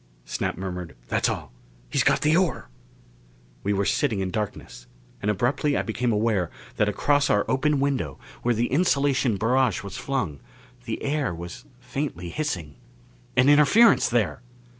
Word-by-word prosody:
_ - - -29
Snap - - -2
murmured, 90 -3 -5
"That's - - +1
all. - - -4 0.4
He's - - +1
got - - +3
the 155 +2 +3
ore!" 180 - 0 0.9
We 100 - -1
were 100 0 +1
sitting 115 -4 +1
in 95 -1 -2
darkness, 100 - -5 0.3
and 105 - -1
abruptly 135 +7 +1
I - - 0
became 120 +2 -1
aware 105 -5 +1 0.3
that 105 - +3
across 145 +8 +2
our 105 - +3
open 145 +2 +1
window, 135 - -1 0.2
where 120 0 +1
the 115 +2 +1
insulation 140 - +2
barrage 115 -1 +1
was 100 - -7
flung, 125 - -2 0.5
the - - -4
air 140 - -1
was 85 - -8
faintly 125 - -4
hissing. 85 - -4 0.6
An 130 +1 +5
interference 150 +11 +6
there! 110 -7 0
120 Hz, 155 wpm, -25 LUFS, 95-140 Hz, 0.9 s, interference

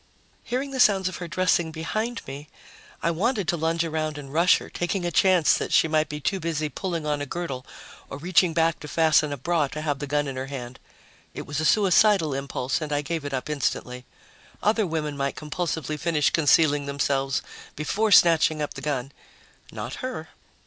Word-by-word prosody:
Hearing 265 +3 -3
the 265 - -4
sounds 195 -5 +4
of 185 - -4
her 175 - -6
dressing 175 -1 +1
behind 215 +9 -3
me, 140 +2 -8 0.5
I 170 - +2
wanted 200 +3 0
to - - +2
lunge 165 +1 0
around 155 -1 -2
and 140 -1 -9
rush 170 +3 +5
her, - - -9
taking 175 +1 -2
a 175 - -1
chance 180 -2 +4
that - - -2
she - - +4
might 155 -1 +1
be 150 - -5
too 190 +6 -1
busy 155 -3 -2
pulling 170 -2 -4
on 150 -1 -1
a 145 - -4
girdle 135 -6 -5 0.4
or - - -6
reaching 175 +3 +3
back 165 0 +1
to 150 - -9
fasten 155 -1 +3
a 145 - -3
bra 160 +2 0
to 155 +3 -6
have 145 -3 -2
the 145 - -4
gun 145 0 0
in 135 -1 -5
her 130 +1 -4
hand. 130 -3 -7 0.6
It - - -6
was 145 +1 -3
a 155 - -1
suicidal 195 -3 +4
impulse 135 0 -2
and 155 -1 -4
I 145 0 0
gave 160 -1 -3
it 145 - -4
up 130 +2 -3
instantly. 125 -4 -3 0.6
Other 215 -1 +2
women 155 -3 -3
might 140 0 -2
compulsively 155 -1 -3
finish 165 -3 +1
concealing 145 -2 +3
themselves 140 -1 0 0.3
before 205 +9 0
snatching 160 -4 +5
up 150 - -3
the - - -8
gun. 140 -3 -3 0.6
Not - - -6
her. 255 - -5
155 Hz, 195 wpm, -25 LUFS, 145-175 Hz, 0.6 s, rush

